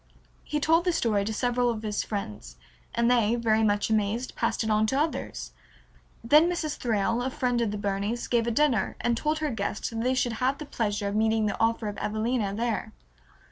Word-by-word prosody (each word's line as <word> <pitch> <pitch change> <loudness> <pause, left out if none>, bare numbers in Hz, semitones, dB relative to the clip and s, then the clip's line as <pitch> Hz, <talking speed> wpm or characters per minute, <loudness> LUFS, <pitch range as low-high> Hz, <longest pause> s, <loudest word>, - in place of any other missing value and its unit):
He 300 - -2
told 325 +3 +3
the 360 - +3
story 215 -10 +1
to 220 - -2
several 245 +2 +1
of 225 -2 -3
his 210 -1 -1
friends 105 - -5 0.4
and 235 0 +2
they, 235 -2 +3
very 225 -2 +2
much 205 0 +1
amazed, 220 +3 0
passed 230 0 0
it 220 - -1
on 215 +1 +3
to 265 +5 +1
others. 310 +2 -3 0.7
Then 300 +8 +5
Mrs. 320 -4 -2
Thrale, 230 0 0
a 255 - -1
friend 250 -3 0
of 230 - +1
the 210 - -3
Burneys, 205 +3 -2
gave 235 -1 +1
a - - +2
dinner, 235 -4 +1
and 240 - +1
told 305 +6 0
her 305 -2 -1
guests 205 -1 -3
that 225 0 -3
they 255 +2 +1
should 245 -2 0
have 265 +2 +2
the 300 - -7
pleasure 210 -6 -2
of 200 - -4
meeting 220 0 +2
the 210 - -2
author 225 -1 +1
of 205 -1 -5
"Evelina" 215 0 -1
there. 225 +2 -2
230 Hz, 210 wpm, -27 LUFS, 210-250 Hz, 0.7 s, Then